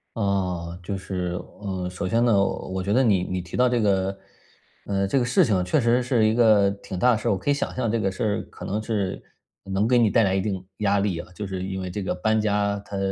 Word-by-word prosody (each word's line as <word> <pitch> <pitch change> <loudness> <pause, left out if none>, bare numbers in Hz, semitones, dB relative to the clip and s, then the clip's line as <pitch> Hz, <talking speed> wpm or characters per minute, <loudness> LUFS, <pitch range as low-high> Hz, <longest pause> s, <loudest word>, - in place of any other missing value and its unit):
呃， 90 -5 -1
就 100 +2 -3
是， 90 -2 -3 0.2
呃， 95 -3 -3
首 90 +1 -4
先 115 +5 +2
呢， 120 - +4
我 95 -1 -3
觉 100 +2 -2
得 130 +5 +4
你 100 -6 +3
你 90 0 -3
提 85 -1 -9
到 125 0 +4
这 120 -1 +1
个， 95 -2 +1 0.7
呃， 100 -1 0
这 135 - +2
个 120 - +1
事 120 - +4
情 95 -6 +1
确 145 +12 +1
实 120 0 +3
是 120 -3 +2
一 110 - +3
个 110 -4 +5
挺 100 -2 -7
大 125 +7 +4
的 115 - +2
事 110 - -4
儿。 - - +3
我 100 - +1
可 95 - -4
以 145 - +5
想 140 - -3
象 120 -4 0
这 115 - 0
个 95 -2 0
事 95 - -4
儿 105 -2 0
可 - - -10
能 105 +2 -2
是 105 -4 -2 0.4
能 100 +2 0
给 125 0 +4
你 115 -2 +4
带 115 +2 +3
来 95 -2 +2
一 95 - +1
定 95 -2 -3
压 100 -1 +2
力 100 -4 -1
啊， - - -7
就 105 - -5
是 95 -1 -4
因 95 0 -4
为 90 -1 -4
这 100 +3 -4
个 95 - -2
搬 110 +4 +1
家， 100 -1 0
它 100 0 -6
100 Hz, 285 characters per minute, -24 LUFS, 95-110 Hz, 0.7 s, 个